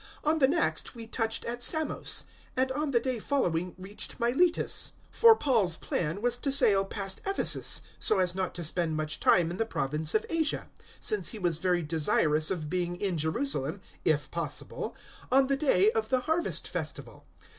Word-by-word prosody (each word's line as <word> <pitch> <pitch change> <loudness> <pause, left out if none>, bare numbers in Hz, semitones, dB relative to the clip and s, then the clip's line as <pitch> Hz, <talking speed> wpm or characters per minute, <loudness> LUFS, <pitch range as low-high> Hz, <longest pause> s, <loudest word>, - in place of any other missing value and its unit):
On 310 +1 +1
the 265 - +5
next 310 -3 -1
we 230 -1 -7
touched 225 0 -2
at 240 +1 -5
Samos; 315 +5 +1 0.3
and 260 +1 +1
on 295 +2 -2
the 245 -4 +2
day 255 -1 -3
following 180 - -1
reached 195 +6 -6
Miletus. 275 +9 +1 0.2
020:016 - - -16
For 455 -1 +8
Paul's 220 - +1
plan 170 +5 -3
was 245 0 +2
to 280 - -1
sail 200 -7 +4
past 195 -1 -2
Ephesus, 390 0 +3 0.2
so 215 - +2
as 180 -2 +1
not 185 0 -3
to 175 - -5
spend 165 0 +1
much 155 -1 -3
time 170 -2 +3
in 175 - -6
the 225 - 0
province 150 0 -1
of 215 - +1
Asia; 320 -2 -2 0.3
since 425 - +2
he 225 - -5
was 175 -5 +1
very 180 -2 0
desirous 155 0 +2
of 165 -5 -2
being 175 +1 -2
in 195 -3 -1
Jerusalem, 165 - 0 0.2
if - - 0
possible, - - -5 0.4
on 270 +1 +5
the 275 +1 0
day 310 +9 +3
of 445 -1 -2
the 255 -1 +1
Harvest 320 +6 +2
Festival. - - -6
215 Hz, 180 wpm, -28 LUFS, 175-275 Hz, 0.4 s, For